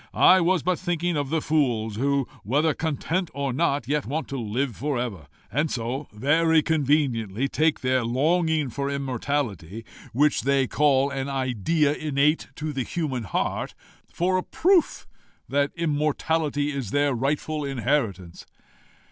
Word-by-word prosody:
I 185 Hz, 0 st, +6 dB
was 175 Hz, -1 st, +2 dB
but 180 Hz, 0 st, 0 dB
thinking 175 Hz, -1 st, -1 dB
of 145 Hz, -2 st, -1 dB
the 160 Hz, 0 st, 0 dB
fools 120 Hz, -8 st, 0 dB
who, 140 Hz, +1 st, +1 dB, 0.2 s
whether 145 Hz, +8 st, +2 dB
content 160 Hz, +4 st, -2 dB
or 140 Hz, -2 st, -2 dB
not, 140 Hz, -3 st, 0 dB
yet 145 Hz, -3 st, -1 dB
want 155 Hz, +5 st, -3 dB
to 135 Hz, -2 st, -4 dB
live 120 Hz, +2 st, -2 dB
for 145 Hz, +1 st, -2 dB
ever, 105 Hz, -12 st, -4 dB, 0.2 s
and 150 Hz, +7 st, 0 dB
so, 130 Hz, +4 st, -3 dB
very 155 Hz, +7 st, +3 dB
conveniently, 135 Hz, -, +1 dB
take 155 Hz, +2 st, +1 dB
their 130 Hz, -1 st, +1 dB
longing 155 Hz, +3 st, +1 dB
for 140 Hz, +4 st, -3 dB
immortality, 125 Hz, -, -3 dB, 0.3 s
which 145 Hz, +5 st, +2 dB
they 135 Hz, 0 st, +2 dB
call 140 Hz, 0 st, +2 dB
an 135 Hz, 0 st, -3 dB
idea 135 Hz, -, +1 dB
innate 150 Hz, +1 st, +1 dB
in 150 Hz, 0 st, -3 dB
the 135 Hz, -, -2 dB
human 130 Hz, -4 st, -3 dB
heart, 85 Hz, -, -2 dB, 0.4 s
for 185 Hz, +2 st, +1 dB
a 185 Hz, -, -1 dB
proof 365 Hz, -1 st, +2 dB, 0.4 s
that 140 Hz, +1 st, +1 dB
immortality 150 Hz, -2 st, 0 dB
is 135 Hz, -7 st, -4 dB
their 145 Hz, +3 st, +1 dB
rightful 145 Hz, +4 st, -1 dB
inheritance." 115 Hz, -, -2 dB
140 Hz, 145 wpm, -25 LUFS, 125-155 Hz, 0.4 s, I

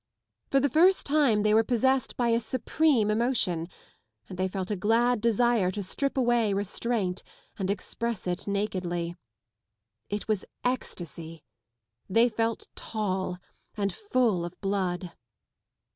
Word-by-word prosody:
For 275 Hz, -, +4 dB
the 280 Hz, -, +3 dB
first 350 Hz, +6 st, +4 dB
time 275 Hz, -8 st, +3 dB
they 215 Hz, 0 st, +3 dB
were 220 Hz, +1 st, +5 dB
possessed 260 Hz, +2 st, +1 dB
by 240 Hz, -1 st, +2 dB
a 230 Hz, 0 st, +3 dB
supreme 245 Hz, 0 st, +1 dB
emotion 215 Hz, -8 st, +1 dB, 0.6 s
and -, -, -8 dB
they 185 Hz, +1 st, 0 dB
felt 190 Hz, +1 st, -4 dB
a -, -, +1 dB
glad 230 Hz, +4 st, +2 dB
desire 235 Hz, -3 st, +3 dB
to 200 Hz, +2 st, -3 dB
strip 275 Hz, +9 st, -2 dB
away, 240 Hz, -5 st, +2 dB
restraint 200 Hz, -1 st, -1 dB, 0.4 s
and 190 Hz, -1 st, -1 dB
express 220 Hz, +2 st, -3 dB
it 180 Hz, +1 st, -2 dB
nakedly. 180 Hz, -4 st, -2 dB, 0.9 s
It 205 Hz, 0 st, -3 dB
was 215 Hz, -3 st, 0 dB, 0.2 s
ecstasy; 170 Hz, -, -3 dB, 0.7 s
they 230 Hz, +5 st, +4 dB
felt 225 Hz, 0 st, -1 dB
tall 190 Hz, -4 st, -2 dB, 0.4 s
and 200 Hz, -1 st, 0 dB
full 250 Hz, -, +1 dB
of 175 Hz, +1 st, -7 dB
blood. 185 Hz, -3 st, -1 dB
215 Hz, 130 wpm, -28 LUFS, 185-240 Hz, 0.9 s, were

